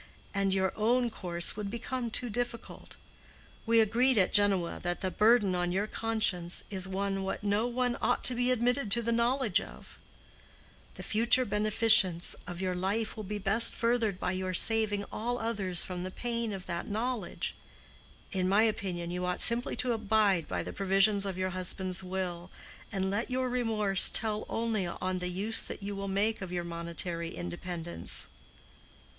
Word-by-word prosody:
And 195 -1 0
your 190 0 0
own 240 +2 +1
course 175 -4 +3
would 210 -1 -4
become 235 +2 -4
too 245 +2 +2
difficult. 235 +1 -5 0.7
We 230 0 +4
agreed 235 +4 +3
at 185 -3 +3
Genoa 195 -4 +2
that 175 0 -3
the 185 - -2
burden 215 -2 +3
on 175 0 -1
your 195 +3 0
conscience 215 -6 -1
is 190 -1 -4
one 195 0 -2
what 190 +1 -4
no 205 +3 +1
one 245 0 -1
ought - - +1
to 255 - +7
be 245 +1 0
admitted 245 0 +1
to 235 +4 +2
the 235 - -1
knowledge 235 -2 +1
of. - - -12 1.0
The - - -8
future 235 +4 +3
beneficence 210 -4 +3
of 175 -1 -6
your 185 -1 -1
life 195 +5 -2
will 215 - -6
be 210 +2 -4
best 205 +3 +5
furthered 230 -5 0
by 180 - -1
your 185 0 -3
saving 215 0 +3
all 240 +3 -2
others 200 -6 0
from 180 -1 -6
the 185 - -4
pain 235 +2 -3
of 190 -2 -6
that 170 -1 -4
knowledge. 230 +3 -3 0.8
In 185 -2 -1
my 205 +3 +4
opinion 180 -6 -2
you 180 +1 -3
ought 180 - -2
simply 235 +1 +2
to 250 -1 +1
abide 210 -6 +1
by - - -3
the - - -7
provisions 195 +1 +2
of 190 -2 -4
your 185 0 -2
husband's 185 0 -2
will, 180 -1 -5 0.4
and 190 -1 -2
let 215 +5 -2
your 255 0 -1
remorse 220 -6 +4
tell 215 -1 0
only 225 -5 -1
on 185 +1 -3
the 180 0 -3
use 200 +5 -1
that - - -7
you 200 0 -4
will 195 0 -5
make 205 +3 0
of 190 -2 -6
your 175 -1 -2
monetary 170 0 -4
independence." 175 -1 -4
200 Hz, 175 wpm, -30 LUFS, 185-230 Hz, 1.0 s, to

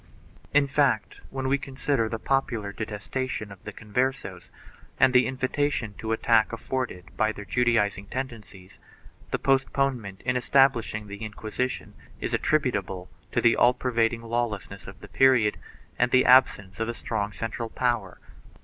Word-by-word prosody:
1 145 0 +5
In - - -1
fact, 140 -6 +1
when 135 -1 -3
we 140 +1 +2
consider 135 -4 -1
the 115 - -3
popular 115 -5 -1
detestation 110 +1 -4
of 95 -2 -13
the - - -5
Converses 110 -4 -3 0.5
and 130 -1 +5
the 125 0 +5
invitation 130 -3 -1
to 110 - -3
attack 110 0 +3
afforded 115 -6 -4
by 110 0 +2
their 105 -1 -9
Judaizing 105 -5 +1
tendencies, 110 -7 -7 0.5
the - - 0
postponement 135 -6 0
in 125 0 0
establishing 125 -4 +2
the 100 +1 -8
Inquisition 110 -3 -4 0.3
is - - -3
attributable 100 -11 0 0.2
to - - +1
the 115 -1 +5
all 125 +1 +4
pervading 115 -2 0
lawlessness 115 -3 -3
of - - -11
the - - -10
period 125 -6 +3 0.4
and 125 - +3
the 130 0 +4
absence 100 -8 +4
of 115 +1 -1
a 120 - -3
strong 105 -3 -3
central 115 +1 -4
power. 120 -8 -1
115 Hz, 150 wpm, -26 LUFS, 105-130 Hz, 0.5 s, 1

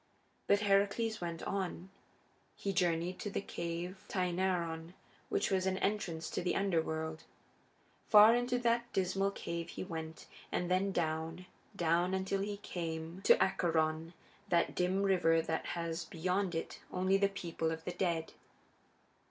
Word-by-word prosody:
But 200 0 +4
Heracles 205 +2 +2
went 170 -1 -4
on. 190 -1 -3 0.6
He 195 - -2
journeyed 175 -1 +1
to 205 - -3
the - - -2
cave 175 0 -5
Tainaron, 175 -2 -1 0.3
which - - 0
was 190 -1 +2
an 190 0 +1
entrance 180 -6 -1
to - - -1
the 180 0 0
Underworld. 160 -4 -1 0.9
Far 215 +1 +9
into 245 +1 +1
that 235 0 +1
dismal 195 +1 +1
cave 170 -3 -5
he - - -5
went, 160 -3 -6 0.3
and 180 0 -1
then 190 +2 +2
down, 165 0 -2 0.3
down, 175 +2 +2
until 190 +1 -1
he 205 0 -3
came 165 -2 -5
to - - +7
Acheron, 160 -2 +1 0.4
that 170 -2 +2
dim 185 +2 +1
river 175 -4 +4
that 160 0 -2
has 170 0 -2
beyond 180 +3 -1
it 165 - -4
only 185 +1 +2
the 200 0 +3
people 170 -4 -3
of 160 0 -5
the - - -2
dead. 170 -3 -1
180 Hz, 145 wpm, -34 LUFS, 165-195 Hz, 0.9 s, Far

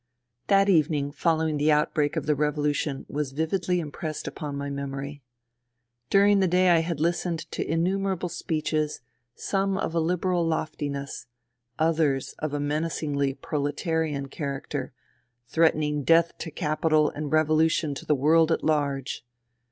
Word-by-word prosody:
That 195 0 +4
evening 150 -5 +2
following 160 -1 +1
the 150 +2 +3
outbreak 150 0 +1
of - - -2
the 150 - +3
revolu 150 0 0
tion 140 -2 -3
was 145 -2 -3
vividly 175 +4 0
impressed 155 0 -5
upon 145 -2 -5
my 140 0 -3
memory. 140 0 -5 0.9
During 200 0 +5
the 190 - +3
day 180 +1 +3
I 170 - +5
had 165 -2 -2
listened 170 +1 0
to - - -2
innumerable 185 +2 0
speeches, 155 -3 -2 0.3
some 195 -1 -1
of 165 - -2
a 170 - +1
Liberal 180 +1 +1
loftiness; 145 -5 -3 0.5
others 155 -4 +1
of 155 -1 -2
a 145 - -2
menacingly 145 -2 -1
prole 150 -3 -2
tarian 155 -3 -2
character, 140 -2 -4 0.5
threatening 150 +1 +2
death 165 +3 +4
to 165 - -5
capital 155 0 +1
and 150 -1 -5
revolution 155 0 +2
to - - -7
the 150 - +4
world 160 +4 +4
at - - 0
large. 140 -5 -1
155 Hz, 145 wpm, -26 LUFS, 145-165 Hz, 0.9 s, During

